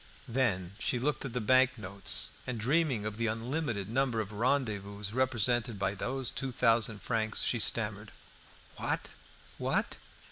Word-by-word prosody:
Then 105 -8 0
she 125 - +1
looked 140 +4 -1
at 130 - -5
the 125 - 0
bank 130 +3 +4
notes, 100 -2 +1 0.2
and 125 -3 -3
dreaming 135 -2 +2
of 105 0 -4
the 115 0 0
unlimited 115 -2 -2
number 120 0 +1
of 105 -1 -3
rendezvous 105 -4 -1
represented 120 -2 +1
by 95 0 0
those 130 +5 -2
two 135 -1 -3
thousand 115 -3 +2
francs, 110 -2 0
she 115 - +1
stammered 105 -1 +1 0.7
"What! - - -2 0.5
what!" - - 0
115 Hz, 145 wpm, -31 LUFS, 105-130 Hz, 0.7 s, bank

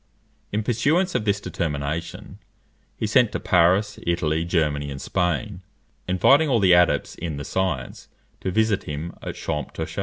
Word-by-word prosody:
In 105 +1 -1
pursuance 150 - +1
of 105 - -1
this 100 -1 +1
determination, 80 -1 -4 0.6
he - - -2
sent 115 +1 +3
to - - -2
Paris, 95 +4 +2
Italy, 80 -2 0
Germany, 75 -5 0
and 70 -1 -6
Spain, 90 +4 -2 0.5
inviting 135 - +4
all 120 -4 +3
the 95 -3 +5
adepts 90 0 +3
in 80 -4 -5
the 70 - -6
science 80 -10 -3 0.3
to - - -3
visit 110 +1 +1
him 75 +3 -5
at - - -6
Champtocé. 75 -3 -4
90 Hz, 150 wpm, -23 LUFS, 80-105 Hz, 0.6 s, the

